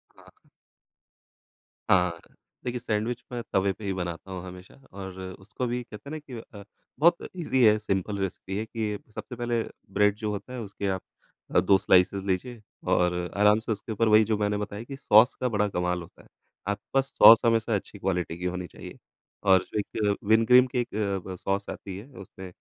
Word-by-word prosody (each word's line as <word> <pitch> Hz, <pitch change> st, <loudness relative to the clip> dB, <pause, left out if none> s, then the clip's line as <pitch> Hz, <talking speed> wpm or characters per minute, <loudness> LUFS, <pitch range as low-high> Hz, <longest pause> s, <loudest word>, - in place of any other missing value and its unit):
हाँ। -, -, -21 dB, 1.4 s
हाँ। 90 Hz, -3 st, +3 dB, 0.5 s
देखिए 125 Hz, 0 st, -2 dB
सैंडविच 115 Hz, +1 st, -2 dB
मैं 120 Hz, -1 st, -3 dB
तवे 95 Hz, 0 st, +3 dB
पे 110 Hz, -, -14 dB
ही 100 Hz, -, -1 dB
बनाता 90 Hz, +1 st, -5 dB
हूँ 90 Hz, -1 st, -5 dB
हमेशा 90 Hz, 0 st, -11 dB, 0.2 s
और 95 Hz, -1 st, -8 dB, 0.2 s
उसको 110 Hz, +6 st, -5 dB
भी 120 Hz, +1 st, -2 dB
कहते 115 Hz, +3 st, -11 dB
हैं -, -, -8 dB
ना 155 Hz, -, -4 dB
कि 145 Hz, -3 st, -13 dB, 0.3 s
अ, -, -, -10 dB, 0.4 s
बहुत 170 Hz, +3 st, +3 dB
ईज़ी 130 Hz, -8 st, +1 dB
है, 110 Hz, -1 st, +6 dB
सिंपल 100 Hz, -1 st, -2 dB
रेसिपी 95 Hz, 0 st, -4 dB
है 110 Hz, -, -2 dB
कि, 110 Hz, -2 st, -3 dB, 0.2 s
सबसे 125 Hz, -, -7 dB
पहले 120 Hz, -1 st, -1 dB, 0.3 s
ब्रेड 105 Hz, 0 st, +3 dB
जो 105 Hz, 0 st, -3 dB
होता 105 Hz, +5 st, -6 dB
है 125 Hz, -, -5 dB
उसके 100 Hz, -1 st, -5 dB
आप 95 Hz, -1 st, -1 dB, 0.5 s
अ, -, -, +8 dB
2 95 Hz, -, +5 dB
स्लाइसेज़ 95 Hz, +1 st, +3 dB
लीजिए 110 Hz, +5 st, -2 dB, 0.3 s
और 90 Hz, 0 st, +3 dB, 0.2 s
आराम 105 Hz, +1 st, +5 dB
से 115 Hz, 0 st, -5 dB
उसके 110 Hz, +2 st, -4 dB
ऊपर 115 Hz, +1 st, +1 dB
वही 110 Hz, 0 st, +6 dB
जो 105 Hz, -, +2 dB
मैंने 105 Hz, 0 st, 0 dB
बताया 105 Hz, +1 st, -5 dB
कि 135 Hz, +3 st, -8 dB
सॉस 110 Hz, -1 st, +5 dB
का 125 Hz, -, +2 dB
बड़ा 105 Hz, -2 st, +1 dB
कमाल 90 Hz, -2 st, -1 dB
होता 85 Hz, -, -14 dB
है। -, -, -21 dB, 0.4 s
आपके 100 Hz, 0 st, -4 dB
पास 135 Hz, 0 st, +1 dB
सॉस 115 Hz, -1 st, +10 dB
हमेशा 115 Hz, -1 st, +2 dB
अच्छी 100 Hz, +1 st, -6 dB
क्वालिटी 90 Hz, -3 st, -2 dB
की 90 Hz, -, -6 dB
होनी 90 Hz, 0 st, -3 dB
चाहिए -, -, -11 dB, 0.5 s
और 95 Hz, -1 st, +6 dB
जो 105 Hz, -, 0 dB
एक 105 Hz, 0 st, -1 dB
विन 110 Hz, +1 st, +5 dB
ग्रीन 125 Hz, +1 st, +7 dB
की 125 Hz, 0 st, -2 dB
एक 120 Hz, -, -2 dB, 0.4 s
ब 95 Hz, -, -6 dB
सॉस 100 Hz, +1 st, -2 dB
आती 95 Hz, -1 st, -7 dB
है 105 Hz, +6 st, -10 dB
उसमें 95 Hz, 0 st, -10 dB
105 Hz, 200 wpm, -27 LUFS, 95-115 Hz, 1.4 s, सॉस